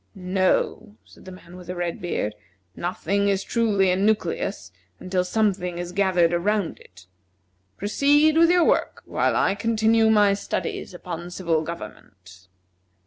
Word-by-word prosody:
"No," 190 +3 -1
said - - -18
the 185 - -9
man 180 -1 -13
with 180 -1 -12
the 180 - -5
red 175 -1 -4
beard, 140 -11 -2 0.4
"nothing 200 +3 -1
is 195 -1 0
truly 205 -5 +1
a - - +2
nucleus 185 - -1 0.3
until 185 0 -1
something 185 -3 -1
is 175 0 -5
gathered 180 -3 +2
around 200 +1 -1
it. 95 0 -18 0.7
Proceed 290 +9 +3
with 330 +1 +5
your 355 -1 +4
work, - - 0
while - - 0
I - - +2
continue 225 +1 +2
my 210 -2 +4
studies 200 -2 -4
upon 175 -1 -7
civil 170 -3 -1
government." 95 - -10
185 Hz, 140 wpm, -23 LUFS, 175-210 Hz, 0.7 s, with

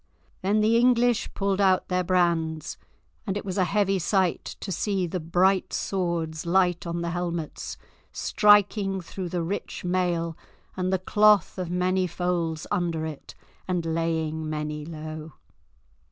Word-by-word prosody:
Then 205 +3 +2
the 220 +2 +4
English 245 -1 +3
pulled 195 0 0
out 190 -1 +3
their 180 0 0
brands, 170 -3 0 0.5
and 195 0 -1
it 205 - -6
was 190 0 -2
a 185 - +4
heavy 195 0 +1
sight 185 0 +1 0.2
to 195 - -5
see 190 +1 0
the 180 +2 -3
bright 180 +4 +2
swords 170 -4 -2
light 180 0 +2
on 170 0 -2
the 170 - -2
helmets, 170 -2 -4 0.3
striking 205 -2 +3
through 180 +1 -6
the 175 -1 -2
rich 185 +1 -4
mail, 175 -2 0 0.4
and 185 0 -1
the 190 - +3
cloth 210 +1 +3
of 180 -2 -3
many 180 +1 +1
folds 170 -2 -2
under 170 -5 0
it, 155 -3 -8 0.3
and 180 -2 -1
laying 160 -1 -1
many 150 -1 -4
low. 155 -1 -7
180 Hz, 145 wpm, -26 LUFS, 165-195 Hz, 0.5 s, the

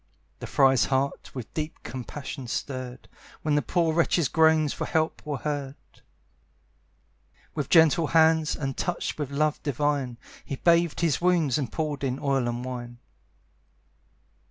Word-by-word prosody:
The - - -6
friar's 135 -2 +4
heart 135 +1 -1
with 125 -4 -7
deep 155 0 -5
compassion 130 +2 -7
stirred, 130 0 -5 0.4
When 155 - +1
the 145 - +3
poor 165 -1 +1
wretch's 165 -3 +2
groans 160 -2 +4
for - - -4
help 160 0 -1
were 145 -2 -2
heard 145 -1 -3 1.8
With 150 -4 -3
gentle 160 -1 +5
hands, 160 -1 +4
and 135 -3 -3
touched 175 -2 -3
with 145 -3 -2
love 150 +2 0
divine, 140 -3 -1 0.3
He 140 - -5
bathed 170 +2 +2
his 165 -3 +1
wounds, 170 -7 +2
and 135 -5 -3
poured 150 -3 -3
in 130 -1 -1
oil 135 -3 0
and 120 +1 -3
wine. 120 -1 -6
145 Hz, 140 wpm, -26 LUFS, 130-160 Hz, 1.8 s, gentle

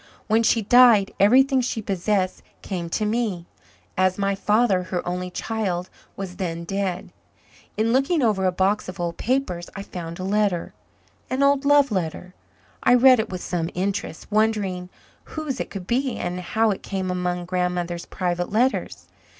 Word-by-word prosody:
When 220 +1 +3
she 225 0 +2
died 235 -3 +6
everything 260 +6 +5
she 245 -1 -2
possessed 195 -1 -1 0.2
came 175 -4 -4
to 215 +5 -1
me, 210 -6 -1 0.5
as 185 0 +2
my 200 0 0
father, 205 0 +2
her 180 -1 -4
only 180 +1 -3
child, 185 -3 -3 0.2
was 185 -2 -7
then 170 -3 -3
dead. 190 0 -3 0.6
In 225 +2 +1
looking 275 +4 +2
over 205 -5 +2
a - - +2
box 190 +2 0
of 185 - -9
old 170 -1 -3
papers 215 -9 -1
I 195 - -5
found 170 -3 -7
a 185 - -5
letter 200 -2 0 0.6
an 260 +2 0
old 280 0 +3
love 285 -2 +5
letter. 180 -1 -3 0.5
I 245 - +5
read 255 0 +7
it 220 - -1
with 185 -1 -6
some 170 -2 -2
interest, 195 -2 -3
wondering 205 -4 0 0.4
whose 305 -5 -5
it - - -3
could 195 -3 -7
be 255 +4 0
and 180 +1 -3
how 220 +5 +1
it 195 - -4
came 190 -2 -3
among 180 -1 -2
Grandmother's 180 -1 -2
private 175 -1 -2
letters. 245 +5 0
195 Hz, 165 wpm, -23 LUFS, 180-225 Hz, 0.6 s, read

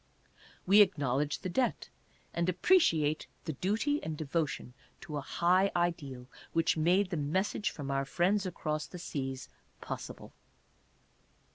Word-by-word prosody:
We 200 +3 +7
acknowledge 145 -6 +2
the 185 - -3
debt, 245 +8 0 0.4
and 170 +1 0
appreciate 165 - +3 0.2
the 160 - -2
duty 220 - 0
and 160 -1 -4
devotion 145 -4 -2 0.3
to 155 -6 -5
a - - -2
high 185 +7 +2
ideal 155 -8 -1 0.3
which 165 0 +2
made 180 +5 +2
the 170 - -1
message 185 +8 0
from 140 -2 -5
our 135 0 +1
Friends 190 +7 +1
Across 155 -3 -3
the 180 - -9
Seas 135 -6 -4 0.3
possible. - - -7
165 Hz, 130 wpm, -31 LUFS, 145-185 Hz, 0.4 s, We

